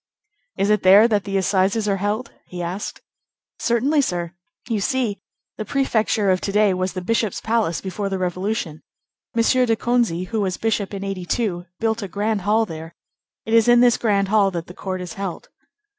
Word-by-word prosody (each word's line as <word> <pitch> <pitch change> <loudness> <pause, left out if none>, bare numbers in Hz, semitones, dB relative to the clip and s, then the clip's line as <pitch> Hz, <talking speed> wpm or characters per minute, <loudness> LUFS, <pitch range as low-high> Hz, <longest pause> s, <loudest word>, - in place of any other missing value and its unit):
"Is 200 +2 +2
it 210 - +3
there 200 +4 +7
that 210 -4 0
the 195 -1 -1
Assizes 195 +3 +1
are 200 -1 +1
held?" 210 +5 -2
he 175 -1 -6
asked. 180 +4 -5 0.6
"Certainly, 265 +6 +2
sir; 175 -7 -2 0.3
you 225 -4 -1
see, 235 -2 -1 0.4
the - - -1
prefecture 220 -5 +1
of 185 - +1
to 200 - -2
day 210 -1 +3
was 185 0 -2
the 185 -2 -5
bishop's 220 0 0
palace 220 -7 0
before 195 +1 -3
the 195 - -2
Revolution. 185 -2 -3 0.5
M. 230 - +3
de 250 -1 +3
Conzié, 225 -7 0
who 225 -2 -1
was 190 -2 -1
bishop 210 -3 -1
in 195 - -5
'82, 185 -1 -2
built 225 0 0
a 200 - -4
grand 205 +2 -1
hall 215 +4 +2
there. 165 -2 -9 0.5
It 225 - -3
is 230 0 +5
in 240 0 +6
this 245 -1 +5
grand 200 -4 +1
hall 205 -2 +4
that 170 -3 -5
the 180 - -11
court 185 0 -5
is 180 -2 -6
held." 195 -3 -6
205 Hz, 190 wpm, -22 LUFS, 185-225 Hz, 0.6 s, there